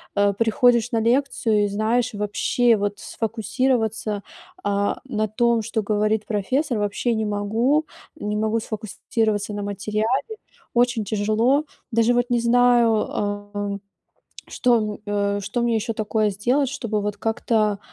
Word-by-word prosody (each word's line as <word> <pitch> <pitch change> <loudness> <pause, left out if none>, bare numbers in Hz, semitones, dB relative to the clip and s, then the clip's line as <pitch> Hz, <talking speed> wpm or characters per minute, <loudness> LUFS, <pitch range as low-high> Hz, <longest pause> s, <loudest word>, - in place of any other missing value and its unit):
Э, 200 0 +3
приходишь 230 +2 +3
на 230 - +1
лекцию 230 -3 +2
и, - - 0
знаешь, 225 +4 0
вообще, 210 +3 +2
вот, 205 0 -2
сфокусироваться, 225 -2 -1 0.4
а, 200 0 0
на 215 -5 -1
том, 235 +2 +2
что 220 +1 -1
говорит 210 +1 0
профессор, 240 +5 -1
вообще 205 +4 0
не 220 -1 -1
могу. 225 +9 +1 0.3
Не 210 -8 -3
могу 220 +1 +1
сфокусироваться 215 -1 -2
на 205 0 -4
материале. 215 - -2 0.4
Очень 245 -2 +2
тяжело. 220 +8 +1 0.3
Даже, 230 +1 +3
вот, 245 +1 +1
не 240 -1 +2
знаю, 240 0 +4 0.3
ам, 205 -1 -3 0.7
что 245 -2 +2
м, 215 -1 -3
э, 205 -1 0
что 210 +5 -2
мне 235 -1 +1
ещё 225 +1 -1
такое 215 0 0
сделать, 245 +8 +1
чтобы, 230 -6 -2
вот, 205 0 -2
как-то, 215 -1 0
220 Hz, 135 wpm, -23 LUFS, 205-240 Hz, 0.7 s, знаю